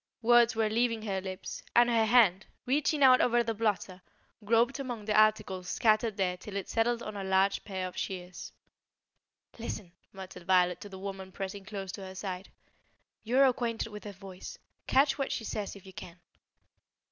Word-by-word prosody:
Words 240 0 +5
were 220 -1 +2
leaving 230 0 0
her 195 -3 -2
lips, 185 0 -6
and 240 0 +6
her 230 -2 +3
hand, 210 -5 +4 0.2
reaching 285 +2 +1
out 255 -1 +7
over 240 0 +3
the 225 0 -2
blotter, 200 -4 -2 0.4
groped 235 +5 +2
among 245 -6 -5
the 210 - 0
articles 215 -4 +2
scattered 215 0 +2
there 180 -2 0
till 200 +2 -9
it 200 - -3
settled 235 +1 0
on 215 -2 -6
a 200 - -4
large 190 +1 +2
pair 190 -2 -4
of 180 - -10
shears. 180 -2 -6 1.1
"Listen," 210 -5 -6 0.2
muttered 185 -2 -10
Violet 180 -1 +3
to 205 - -8
the 190 - -9
woman 190 -1 -7
pressing 195 +1 -6
close 195 -2 -6
to 200 - -8
her 190 0 -9
side. 190 0 -5 0.7
"You 240 +4 0
are 275 - +7
acquainted 235 -3 0
with 210 0 -10
her 205 - -5
voice; 190 -1 -10 0.3
catch 275 +1 +3
what 275 - -1
she 230 - -3
says 210 -2 -4
if 195 - -14
you 190 - -12
can." 175 -1 -10
210 Hz, 180 wpm, -30 LUFS, 190-230 Hz, 1.1 s, out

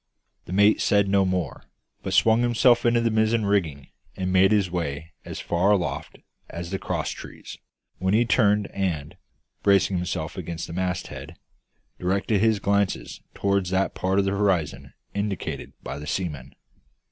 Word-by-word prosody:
The - - -9
mate 105 +3 +4
said 100 -1 +3
no 95 0 +3
more, 90 -5 -2 0.4
but - - -2
swung 115 +1 +5
himself 120 0 +4
into 120 0 +3
the 115 -1 +1
mizzen 110 0 +2
rigging, 80 -9 0 0.3
and 95 0 -1
made 95 +1 +5
his 100 -4 +2
way 80 -2 -3
as - - -6
far 90 +3 +1
aloft 85 -9 0 0.3
as 85 +1 -6
the 95 - -2
cross - - -2
trees; - - -10 0.4
when 95 +2 +1
he 120 +2 +4
turned 105 -3 +3
and, 85 -7 -2 0.5
bracing 100 -1 +3
himself 85 -3 -3
against 85 -2 -5
the - - -8
masthead, 85 -4 -4 0.6
directed 100 +3 +1
his 110 -1 +3
glances 100 -1 -1
toward 100 -2 +1
that 95 +1 0
part 95 +1 0
of 100 - +3
the 95 - +1
horizon 80 -9 -1 0.2
indicated 100 -2 -3
by 70 +2 -5
the 75 - -8
seaman. 75 -8 -4
95 Hz, 160 wpm, -25 LUFS, 85-100 Hz, 0.6 s, swung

